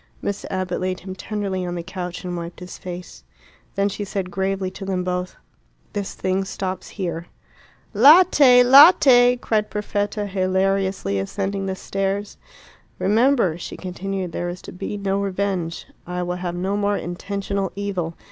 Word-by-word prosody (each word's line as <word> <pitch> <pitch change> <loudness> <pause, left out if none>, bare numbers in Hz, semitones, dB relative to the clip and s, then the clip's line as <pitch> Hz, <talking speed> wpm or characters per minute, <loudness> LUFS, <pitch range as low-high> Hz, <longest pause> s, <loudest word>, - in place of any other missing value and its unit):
Miss 200 0 -4
Abbott 185 -1 -2
laid 185 0 -2
him 190 0 -7
tenderly 195 -1 -3
on 175 0 -3
the 170 - -4
couch 180 -1 -6
and 180 -1 -4
wiped 170 0 -6
his 180 0 -9
face. 180 0 -8 0.5
Then 200 0 +2
she 205 +1 -4
said 190 -2 -4
gravely 190 +1 -1
to 195 - -9
them 190 -2 -1
both, 180 0 -3 0.6
"This 200 -2 -4
thing 190 +1 0
stops 190 -1 -5
here." 170 -3 -3 0.7
"Latte! 290 -6 +7
latte!" 255 -2 +8
cried 215 -3 0
Perfetta, 205 0 -2
hilariously 190 - 0
ascending 195 - -3
the 190 - -2
stairs. 195 +2 -3 0.6
"Remember," 220 - +2
she - - -7
continued, 185 0 -4
"there 175 +1 -3
is 175 +1 -7
to - - -9
be 195 +3 -5
no 195 0 -1
revenge. 190 -4 -2 0.2
I 180 0 -3
will 180 0 -3
have 175 -1 -4
no 190 +3 -1
more 205 0 +1
intentional 195 +2 -3
evil. 190 -5 -3
190 Hz, 155 wpm, -22 LUFS, 180-200 Hz, 0.7 s, latte